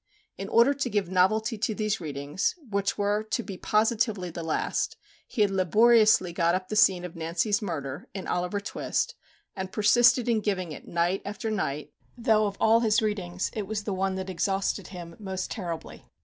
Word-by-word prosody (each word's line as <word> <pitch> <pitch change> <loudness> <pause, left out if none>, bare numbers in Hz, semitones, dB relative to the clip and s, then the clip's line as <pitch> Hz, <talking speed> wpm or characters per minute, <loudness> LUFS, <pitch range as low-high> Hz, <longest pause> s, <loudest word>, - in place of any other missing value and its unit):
In 195 0 -6
order 235 +5 +5
to 265 -2 -2
give 205 -5 -1
novelty 215 +5 +2
to 220 0 -1
these 215 -2 -1
readings, 145 +2 -2
which 200 -2 -1
were 205 +1 +1
to 225 +2 -3
be 195 - -7
positively 215 -3 +1
the 170 - -6
last, 160 -1 -1 0.3
he 215 - +1
had 200 - +1
laboriously 210 0 +4
got 170 0 +2
up 185 0 -4
the 215 - -2
scene 185 -4 +4
of 175 - -8
Nancy's 170 +6 0
murder, 145 -8 -5
in 190 - -5
"Oliver 180 +3 -1
Twist," 200 - -2 0.4
and 190 -1 -5
persisted 240 +3 +4
in 230 -2 +2
giving 185 -5 -2
it 150 - -9
night 175 +3 0
after 210 +2 -4
night, 150 -8 -3 0.2
though 220 -3 +3
of 200 - -5
all 225 +1 +5
his 220 -2 +3
readings 190 -4 -2
it 210 -3 -4
was 210 0 -3
the 205 - -3
one 190 0 -1
that 190 0 -4
exhausted 195 +1 -1
him 175 -3 -9
most 190 -2 -4
terribly. 175 -7 -6
200 Hz, 185 wpm, -27 LUFS, 180-215 Hz, 0.4 s, order